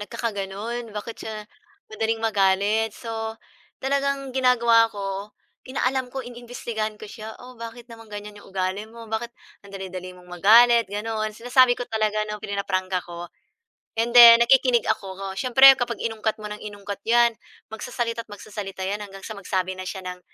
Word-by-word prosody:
nagkakagano'n, 225 +1 -4
bakit 225 +2 -6
siya 215 -1 -6 0.5
madaling 220 +1 0
magalit. 210 0 +1
So 225 -1 -5 0.5
talagang 275 -1 -1
ginagawa 235 -3 +4
ko, 200 -1 -5 0.4
inaalam 260 0 -1
ko, 260 0 -6
ini-imbestigahan 235 -3 -5
ko - - -10
siya, 220 0 -9
o 250 +1 -12
bakit 230 +1 -8
naman 225 -1 -13
ganyan 210 0 -8
'yong - - -16
ugali 190 +2 -3
mo, 230 +1 -11
bakit 230 +2 -2 0.3
ang 200 - -16
dali-dali 185 -1 -7
mong 180 - -16 0.2
magalit 235 +2 +6
gano'n. 215 +2 -2
Sinasabi 245 +1 +4
ko 245 - -4
talaga 215 -1 0
'no, 210 - -6
prinaprangka 185 -2 -2
ko. 175 0 -8 0.7
And 235 +1 +1
then, 235 -1 +11
nakikinig 250 -1 +4
ako. 195 -2 -3
Siyempre 265 +3 +8
kapag 245 -2 -3
inungkat 225 -1 -2
mo 210 - -6
ng 210 - -7
inungkat 205 -1 -7
'yan 235 0 +4 0.4
magsasalita 230 0 -3
at - - -23
magsasalita 200 -2 -7
'yan 205 +2 -2
hanggang 195 -1 -11
sa 220 - -6
magsabi 190 -1 -2
na 185 - -6
siya 190 - -6
ng 180 0 -6
220 Hz, 160 wpm, -24 LUFS, 200-235 Hz, 0.7 s, then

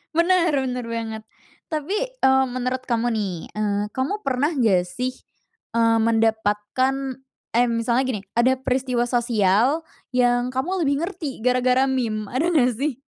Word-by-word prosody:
Bener 340 -1 +3
bener 250 -2 -3
banget. 225 -1 -4 0.4
Tapi, 315 +4 -2 0.3
eee, 265 0 +5
menurut 255 +1 -3
kamu 235 0 +1
nih, 210 -4 -1 0.2
eee, 205 -1 -1
kamu 340 +12 -2
pernah 275 +4 +1
nggak 190 -8 +2
sih, 250 +7 -3 0.6
eee, 230 0 +4
mendapatkan 225 +4 0 0.4
eh, 245 +1 +5
misalnya 235 +2 +1
gini, 225 -7 -2 0.2
ada 255 +2 +4
peristiwa 255 -2 0
sosial 235 - +2 0.3
yang 245 0 +2
kamu 345 +8 -1
lebih 280 +1 +1
ngerti 330 - -5
gara-gara 255 +2 +2
meme, 220 -5 -2
ada 270 +7 0
nggak 255 -5 +4
sih? 280 -2 -1
250 Hz, 135 wpm, -23 LUFS, 230-270 Hz, 0.6 s, eee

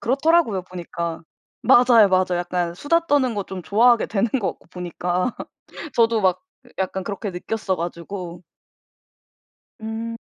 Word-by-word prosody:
그렇더라고요 275 - +2
보니까. 170 -2 -5 0.4
맞아요, 240 -3 +6
맞아요. 185 -1 +2
약간 175 -1 -2
수다 335 - +1
떠는 275 -6 +2
거 205 - -2
좀 185 -1 -7
좋아하게 230 +6 +4
되는 210 +2 0
것 200 - -1
같고 - - -26
보니까. 180 +3 -2 0.6
저도 230 -1 +3
막 185 -2 +1 0.4
약간 190 0 -2
그렇게 200 +2 -4
느꼈어 190 +2 -3
가지고. 175 +1 -6 1.4
음. 225 +1 -5
195 Hz, 290 characters per minute, -22 LUFS, 180-230 Hz, 1.4 s, 맞아요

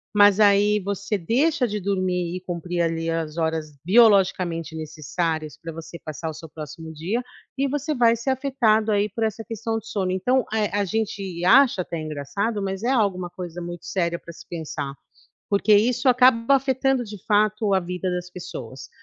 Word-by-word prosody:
mas 205 0 +6
aí 205 0 +5
você 200 +1 -2
deixa 255 - +1
de 210 -1 -3
dormir 185 -3 -1
e 185 - -5
cumprir 175 -1 -3
ali 165 0 -1
as 165 -2 -2
horas 160 -2 -2
biologicamente 185 -6 +3
necessárias 155 0 -3
para 165 -1 -7
você 165 +1 -9
passar 155 +1 -5
o - - -5
seu 160 +1 -9
próximo 160 +1 -9
dia, 190 +11 -2 0.3
e 275 +1 +1
você 290 +2 -2
vai 235 -2 +4
ser 235 +3 -3
afetado 245 -5 +2
aí 205 0 +2
por 225 +3 -3
essa 220 0 -2
questão 225 0 -3
de 225 - -16
sono. 195 -4 -1
Então, 245 +7 +1
eh, 215 -2 +1
a 205 0 0
gente 195 -4 -3
acha 245 -1 +5
até 170 -2 -5
engraçado, 155 +9 -3
mas 195 +1 -3
é 245 - +1
alguma 195 -8 +1
coisa 175 -1 -7
muito 175 0 -7
séria 170 -2 -1
para 170 - -11
se - - -14
pensar, 155 -4 -5 0.6
porque 205 +1 +2
isso 245 +5 +3
acaba 250 +1 +5
afetando, 265 -1 +1
de 210 -3 -10
fato, 210 0 +2
a 190 - +5
vida 180 +1 -3
das 180 0 -3
pessoas, 170 -9 -8
195 Hz, 180 wpm, -24 LUFS, 170-225 Hz, 0.6 s, mas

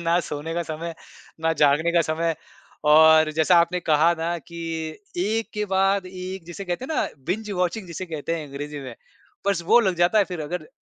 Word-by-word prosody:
ना 170 +1 +2
सोने 150 +3 -4
का 170 - 0
समय, 165 +1 -5 0.5
ना 165 0 +2
जागने 150 +3 +3
का 170 - +4
समय 165 +1 -1 0.6
और 160 0 +7
जैसा 170 +3 +4
आपने 175 +1 0
कहा 160 +1 +3
ना 170 +1 -1
कि 170 +2 -12 0.6
एक 220 +4 -1
के 210 0 -1
बाद 195 0 +2
एक 185 0 -7
जिसे 175 +3 -7
कहते 180 +7 -3
हैं 315 - -4
ना - - +1 0.2
बिंज 210 +4 -2
वॉचिंग 180 +1 -1
जिसे 175 +2 -6
कहते 165 +1 -3
हैं 155 -2 -6
अंग्रेज़ी 145 +1 -6
में, 130 -3 -8 0.5
बस 195 -4 +1
वो 235 +4 +6
लग 190 -5 +1
जाता 175 +5 +3
है 200 - +5
फिर 180 -4 -6
अगर 155 +1 -5
170 Hz, 200 wpm, -24 LUFS, 160-185 Hz, 0.6 s, और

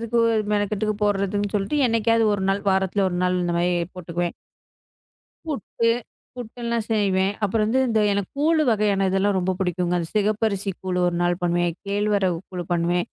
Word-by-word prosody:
எதுக்கு 230 +1 0 0.3
மெனக்கெட்டு 210 0 0
போடுறதுன்னு 205 0 0
சொல்லிட்டு 205 +9 0
என்னைக்காவது 230 0 +2
1 195 -1 -2
நாள் 200 +1 -1
வாரத்துல 190 +1 +1
1 175 - -3
நாள் 180 0 +1
இந்த 175 -1 -1
மாரி 175 +1 +2 0.2
போட்டுக்குவேன். 175 -1 -3 1.1
புட்டு 230 -5 -1 0.5
புட்டேல்லாம் 235 -1 -4
செய்வேன். 195 -2 +2
அப்புறம் 215 +2 +1
வந்து 250 +5 +2
இந்த 225 -2 +2
எனக்குக் 200 +6 -3
கூழு 315 +1 +3
வகையான 205 -3 +2
இதெல்லாம் 195 +1 +1
ரொம்ப 185 +1 0
பிடிக்கும். 180 -1 -1
அந்த 165 -1 -3
சிகப்பரிசி 210 -1 +1
கூழு 185 -1 -2
ஒரு 175 - -2
நாள் 175 0 +1
பண்ணுவேன். 175 0 +1
கேழ்வரகு 200 -3 +1
கூழு 180 -2 -5
பண்ணுவேன். 175 +1 +1
200 Hz, 155 wpm, -23 LUFS, 180-215 Hz, 1.1 s, கூழு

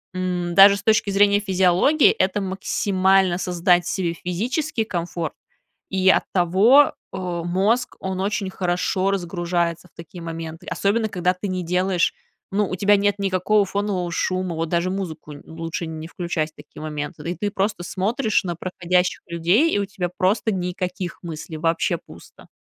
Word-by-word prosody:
м, 180 -2 -2
даже 200 +1 +8
с 200 - -9
точки 215 -1 +3
зрения 200 +1 +4
физиологии, 190 - +4
это 190 +2 +1
максимально 190 -1 +1
создать 175 -1 +2
себе 175 -3 -1
физический 225 - -2
комфорт, 170 -4 -3 0.6
и 190 0 +2
оттого, 195 +11 +4 0.2
а, 180 -3 -4
мозг, 205 +8 0
он 190 0 -3
очень 200 -1 -1
хорошо 185 +1 0
разгружается 175 -2 -2
в - - -77
такие 170 +1 -10
моменты, 165 -1 -7
особенно 215 +2 0
когда 180 -2 0
ты 185 +3 -5
не 185 -1 -2
делаешь, 180 +1 +1 0.4
ну, 200 0 0
у - - -2
тебя 205 +3 +4
нет 205 0 +1
никакого 200 +2 +2
фонового 195 -2 -2
шума. 185 0 -1
Вот 165 0 -2
даже 170 +1 0
музыку 165 -6 -5
н 145 - -12
лучше 165 +1 -5
не 160 0 -7
включать 170 -2 -3
в - - -72
такие 145 +1 -13
моменты, 150 +1 -5
и - - -4
ты 205 +2 -2
просто 200 -1 -1
смотришь 215 +5 0
на 175 -2 -2
проходящих 180 0 0
людей. 175 - +2
И - - +2
у 200 - 0
тебя 190 -2 -4
просто 205 +3 +1
никаких 180 0 -4
мыслей, 160 -1 -7
вообще 165 +2 0
пусто. 85 +2 -15
185 Hz, 160 wpm, -22 LUFS, 170-200 Hz, 0.6 s, даже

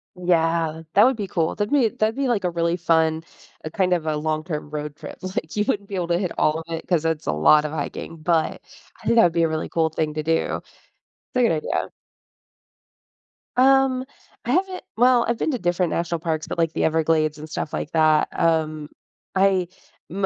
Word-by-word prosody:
Yeah, 165 -2 +1
that 205 - +6
would 260 +1 +3
be 205 -3 -3
cool. 165 -3 0
That'd 205 +3 -2
be 260 -6 +4
that'd 215 +1 -1
be, 275 -1 -1
like, 230 -6 0
a 180 - +1
really 170 0 0
fun 160 -2 +1 0.4
a, 155 - -4
kind 185 -1 +1
of, 170 -3 -1
a 155 - 0
long-term 155 0 -3
road 150 -1 -5
trip, - - -10
like, 185 -4 -4
you 210 - +2
wouldn't 200 -1 -1
be 200 - -4
able 180 -2 -2
to 170 0 +1
hit 180 -1 -2
all 155 +1 +2
of - - -7
it 165 - -5
'cause 165 -3 +1
it's 160 -2 -1
a - - +2
lot 150 - +5
of 150 - -3
hiking, 160 +2 -5
but 160 0 0 0.4
I - - -15
think - - +2
that 225 - +8
would 170 - +3
be 170 0 +2
a - - +3
really 155 0 -3
cool 160 -1 +1
thing 155 -1 -2
to 155 - -2
do. 165 +1 0
It's - - -18 0.6
a 250 - +4
good 235 - +4
idea. 155 -1 -2 1.7
Um, 265 0 +4 0.4
I - - -1
haven't 375 0 0
well, 245 0 +4
I've 235 - 0
been - - 0
to 250 - -2
different 175 -1 0
national 170 0 -1
parks, 160 -2 -2
but - - -5
like 165 -1 +1
the - - -1
Everglades 155 -1 +1
and 155 +1 -9
stuff 150 - -4
like 155 - -4
that, 155 -1 +3
um, 155 -2 +1 0.5
I 190 -2 +3 0.4
m 195 +2 -1
165 Hz, 215 wpm, -23 LUFS, 155-195 Hz, 1.7 s, that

